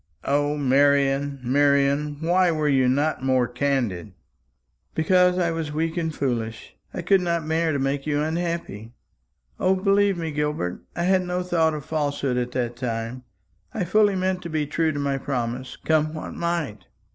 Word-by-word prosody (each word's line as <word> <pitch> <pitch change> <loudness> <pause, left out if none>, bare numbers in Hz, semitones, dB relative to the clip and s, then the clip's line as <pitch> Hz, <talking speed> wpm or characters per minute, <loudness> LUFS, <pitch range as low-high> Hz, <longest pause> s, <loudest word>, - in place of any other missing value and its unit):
O, 145 +1 +1
Marian, 140 0 +2
Marian, 140 +2 +2
why 180 +2 +3
were 155 -2 0
you 130 -3 +3
not 145 +1 0
more 130 -2 +2
candid?" 125 -9 -1 0.8
"Because 180 +2 +3
I 170 -2 +1
was 165 -2 -3
weak 160 +2 -1
and 165 -2 -1
foolish. 115 -6 -3 0.2
I 175 - -5
could 195 +2 +4
not 170 -3 -1
bear 160 +1 +1
to 145 - 0
make 135 +1 -1
you 145 -1 +1
unhappy. 160 - -3 0.7
O, 190 +1 +3
believe 195 0 +2
me, 165 -2 -3
Gilbert, 150 -12 -2
I 170 - -1
had 185 +1 +3
no 180 0 -2
thought 165 -3 +1
of 150 - -7
falsehood 145 -4 -1
at 125 0 -1
that 120 -2 -2
time. 120 0 -4 0.5
I 210 - 0
fully 205 +2 +3
meant 185 0 -1
to 170 - -6
be 155 -2 -1
true 160 +2 0
to 145 - -5
my 140 -1 -1
promise, 125 -1 -3
come 155 0 +1
what 155 - -6
might." 170 -11 -3
150 Hz, 170 wpm, -24 LUFS, 135-170 Hz, 0.8 s, could